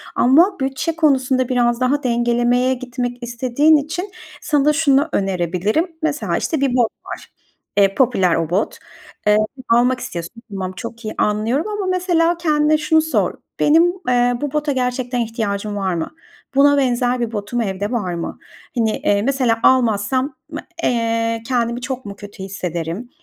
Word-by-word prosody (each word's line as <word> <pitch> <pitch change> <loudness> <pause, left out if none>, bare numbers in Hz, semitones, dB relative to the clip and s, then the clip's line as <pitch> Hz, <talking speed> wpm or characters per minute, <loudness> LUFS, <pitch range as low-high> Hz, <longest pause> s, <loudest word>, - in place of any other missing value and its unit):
ama 335 +10 +4
bütçe 265 +4 -1
konusunda 260 -5 +2
biraz 240 -1 +1
daha 285 +3 +1
dengelemeye 240 +1 +2
gitmek 245 -1 -5
istediğin 255 +6 +3
için 350 +7 -4 0.3
sana 295 0 +2
şunu 295 -1 +3
önerebilirim. 195 - -1
Mesela, 310 -1 -1
işte, 315 -5 -1
bir 270 -3 +1
bot 240 -3 +3 0.2
var, - - -9 0.4
eee, 195 -1 +4
popüler 190 -9 +3
o 165 -1 -1
bot. 185 +5 -1 0.5
Eee, 210 0 +5 0.3
almak 245 +2 +3
istiyorsun. 175 +3 -7
Tamam, 190 -2 -4
çok 230 +3 -8
iyi 215 - -3
anlıyorum 225 - 0
ama, 415 -2 -3
mesela, 350 -2 +1
kendine 305 -2 +2
şunu 315 +1 +3
sor: 320 0 0 0.3
"Benim, 330 +4 +4 0.2
eee, 245 0 +2
bu 290 -2 -3
bota 300 -1 0
gerçekten 250 -1 -1
ihtiyacım 215 -3 -2
var 190 -2 -1
mı? 165 -2 -3 0.4
Buna 285 +1 +5
benzer 250 -2 +1
bir 235 -1 -2
botum 215 +3 -3
evde 200 0 -3
var 205 -8 -2
mı? 170 -1 -5 0.4
Hani, 220 -2 +1
eee, 200 0 +1
mesela, 250 -2 +1
almazsam, 255 +3 +2 0.2
m 305 - -5 0.2
eee, 230 -1 0
kendimi 240 -1 0
çok 260 -1 -5
mu 200 -1 -7
kötü 205 -1 -10
hissederim, 180 +2 -4
245 Hz, 150 wpm, -19 LUFS, 215-285 Hz, 0.5 s, Eee